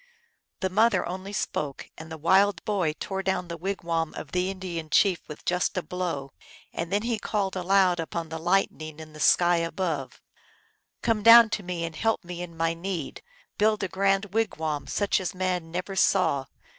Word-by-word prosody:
The 190 -1 0
mother 225 +5 +3
only 185 +3 -6
spoke, 150 -8 -3
and 160 0 -10
the 160 - -5
wild 190 +4 +3
boy 185 -7 0
tore 195 -1 -3
down 190 -2 -1
the 170 - -4
wigwam 170 -3 -2
of 140 - -8
the 180 +1 0
Indian 180 -4 -5
chief 185 +1 +3 0.2
just 180 +3 0
with 185 - -1
a - - -31
blow, 165 -7 -3 0.4
and 170 +1 -4
then 205 +2 +1
he 230 -2 -1
called 200 -3 -2
aloud 185 -1 +3
unto 165 0 -3
the 160 0 -6
Lightning 160 -3 0
in 155 -1 -10
the 155 - -11
sky 175 +3 +4
above, 165 -4 -3 0.4
" - - -41
Come 225 -2 +1
down 230 +1 +9
to 215 - -1
me 175 -2 -3
and 165 -1 -7
help 225 +2 0
me 175 0 -7
in 170 -2 -8
my 165 0 +1
need! 170 -2 -5 0.4
Build 215 0 +2
a - - 0
grand 195 +1 0
wigwam 160 -10 -1
such 200 +7 +1
as 185 -1 -4
man 180 -3 -1
ne 175 +2 -2
er 195 - -6
saw 180 -8 +2
180 Hz, 190 wpm, -26 LUFS, 165-195 Hz, 0.4 s, down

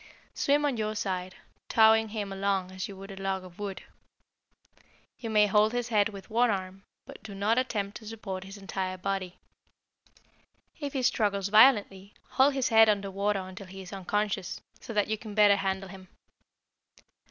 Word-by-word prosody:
Swim 290 +1 +2
on 275 -4 0
your 215 0 -2
side, 185 -3 -3 0.3
towing 220 0 +5
him 205 -2 -4
along 195 -1 -1
as 185 0 -5
you 195 - -10
would 195 +1 -9
a 195 0 -9
log 190 -1 -2
of 180 +1 -14
wood. 200 -2 -5 1.4
You 230 - -5
may 210 -1 +5
hold 210 +2 +3
his 245 -1 -2
head 210 -2 +3
with 200 -2 -10
one 235 +2 +2
arm, 190 -1 -3 0.2
but - - -12
do 205 -2 -9
not 210 +5 +2
attempt 210 -5 -2
to 220 - -13
support 195 -4 -6
his 195 +1 -10
entire 190 -1 -4
body. 185 -1 -3 1.4
If 285 -2 -4
he 265 -2 -1
struggles 200 -4 +1
violently, 205 -3 +4
hold 270 +1 +3
his 265 -2 +1
head 225 -1 +7
under 200 -2 0
water 200 +1 0
until 185 +1 -9
he 190 +1 -9
is 185 - -11
unconscious, 200 0 -2 0.2
so - - -9
that 210 -2 +1
you 215 0 -2
can 215 -3 -9
better 205 -1 +6
handle 190 -1 -2
him. 190 0 -12
200 Hz, 175 wpm, -28 LUFS, 195-220 Hz, 1.4 s, head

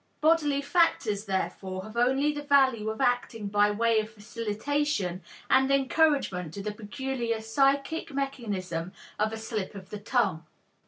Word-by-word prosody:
Bodily 300 -3 +3
factors, 225 - +2
therefore, 190 -1 -3
have 215 +2 -10
only 265 +5 +3
the 295 0 -5
value 265 -6 +3
of 220 - -5
acting 240 -4 0
by 205 +1 +4
way 225 +2 +2
of 215 0 -3
facilitation 220 -1 -2 0.3
and 265 0 +4
encouragement 275 - +2
to 200 - -5
the 210 - -2
peculiar 230 +2 -3
psychic 275 +8 +1
mechanism 205 -11 -3 0.3
of 215 +1 +1
a 225 - -4
slip 220 -3 -4
of 190 0 -10
the 210 - -5
tongue. 205 -7 0
225 Hz, 145 wpm, -28 LUFS, 205-275 Hz, 0.3 s, by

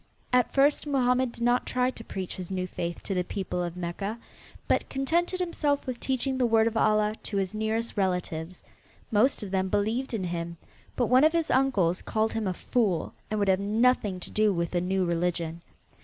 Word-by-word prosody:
At 250 -1 +4
first 285 +2 +3
Mohammed 255 -3 +2
did 235 - -6
not 245 +1 +2
try 250 0 +1
to 230 - -9
preach 190 -4 -5
his 180 -2 -6
new 185 -1 -2
faith 170 -1 -5
to 195 - -3
the 180 -1 +1
people 180 -1 -3
of 175 0 -4
Mecca, 190 +5 -3 0.5
but - - +1
contented 340 +7 0
himself 300 -5 0
with 255 -3 -4
teaching 265 0 -1
the 250 - +3
word 225 -1 +4
of 230 0 -1
Allah 215 -1 +3
to 205 - -4
his 190 0 -1
nearest 220 +2 -1
relatives. 180 -3 -2 0.5
Most 225 +3 +3
of 195 - -6
them 190 -1 +1
believed 225 +6 0
in 200 - -2
him, 170 -1 -4 0.4
but 245 - +2
one 255 +4 +5
of 315 +1 +5
his 335 -2 +1
uncles 205 -10 +2
called 220 0 0
him 220 -3 -1
a 185 - 0
fool 205 -8 0 0.2
and 215 - -1
would 200 -1 +1
have 190 0 +4
nothing 210 -1 +2
to - - -6
do 215 -1 +3
with 170 -2 -1
the 175 - 0
new 185 +1 0
religion. 170 -1 -1
215 Hz, 200 wpm, -27 LUFS, 185-250 Hz, 0.5 s, one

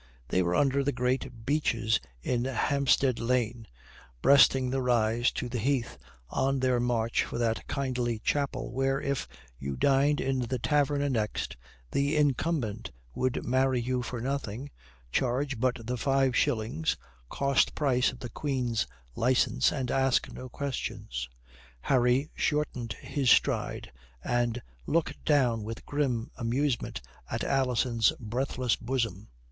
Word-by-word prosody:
They 95 - +2
were 90 0 +1
under 140 +3 +3
the 145 - +1
great 125 -2 -2
beeches 115 - +1 0.2
in 120 0 0
Hampstead 135 0 +2
Lane, 120 -1 0 0.6
breasting 135 -2 +6
the 135 0 0
rise 120 -1 +2
to 125 - -3
the 120 0 -3
heath, 120 - -1 0.3
on 135 0 +1
their 130 -1 +2
march 120 -1 +1
for - - -5
that 115 -1 -1
kindly 125 -4 -1
chapel, 135 +3 -1
where, 135 +1 +1
if 140 -2 -2 0.3
you 70 0 -4
dined 140 - +3
in 135 -1 0
the 125 +1 -1
tavern 145 +2 +1
annexed, 115 -7 -1 0.4
the 140 +2 +1
incumbent 140 -6 0 0.2
would 130 -1 -1
marry 130 0 +2
you 125 +1 -1
for 120 0 -5
nothing, 135 0 -3 0.4
charge 130 - 0
but 130 +1 +1
the 125 +2 -2
five 135 0 +2
shillings, 110 -11 0 0.3
cost 140 -1 +2
price 130 -4 +2
of 130 - -13
the 120 - -5
Queen's 125 - -1 0.3
licence, 125 0 +3
and 130 -4 -2
ask 135 -1 +2
no 130 0 -8
questions. 65 - -4 0.5
Harry 125 - +2
shortened 145 -6 -1
his 135 -4 -1
stride, - - +2 0.3
and 120 -1 0 0.2
looked 165 +1 0
down 125 -7 +3
with 115 +1 -7
grim 130 -6 -1
amusement 125 - -1 0.3
at - - -2
Alison's 125 -3 +2
breathless 125 +1 -1
bosom. 115 -5 -2
125 Hz, 135 wpm, -29 LUFS, 115-135 Hz, 0.6 s, breasting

